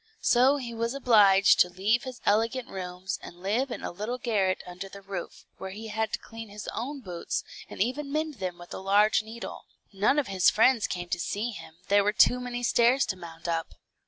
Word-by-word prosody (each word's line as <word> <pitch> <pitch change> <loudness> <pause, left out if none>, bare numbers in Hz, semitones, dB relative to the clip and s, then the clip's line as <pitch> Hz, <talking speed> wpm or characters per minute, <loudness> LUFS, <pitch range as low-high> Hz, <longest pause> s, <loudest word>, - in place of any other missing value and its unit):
So 255 +4 +5
he 240 -4 -6
was 230 +3 -2
obliged 210 -7 +5
to 180 - +5
leave 205 +7 +1
his 255 -2 -8
elegant 230 +4 +1
rooms, 185 0 -5
and - - -10
live 230 +8 0
in - - -6
a - - -3
little 210 +7 -4
garret 205 -7 0
under 180 +2 -8
the 200 0 -12
roof, 190 -3 -7
where 190 - -5
he 215 +3 -8
had 220 +1 -1
to - - +1
clean 225 -1 -10
his 205 +1 -9
own 275 +4 -4
boots, 175 -6 -4 0.3
and - - -10
even 280 +5 -4
mend 310 -1 -2
them 180 -2 -3
with 175 0 -11
a - - -5
large 205 +3 +3
needle. 225 +2 -8 0.3
None 205 +9 +2
of 295 - +2
his 190 -3 +4
friends 230 +1 +3
came 175 -1 -5
to 175 - -1
see 210 +7 -2
him, 165 -5 -10
there 200 0 +4
were 210 +1 +1
too 250 +3 +5
many 245 -1 -5
stairs 240 +3 +4
to 190 - -3
mount 170 -1 -9
up. 165 -1 -2
210 Hz, 215 wpm, -28 LUFS, 190-245 Hz, 0.3 s, So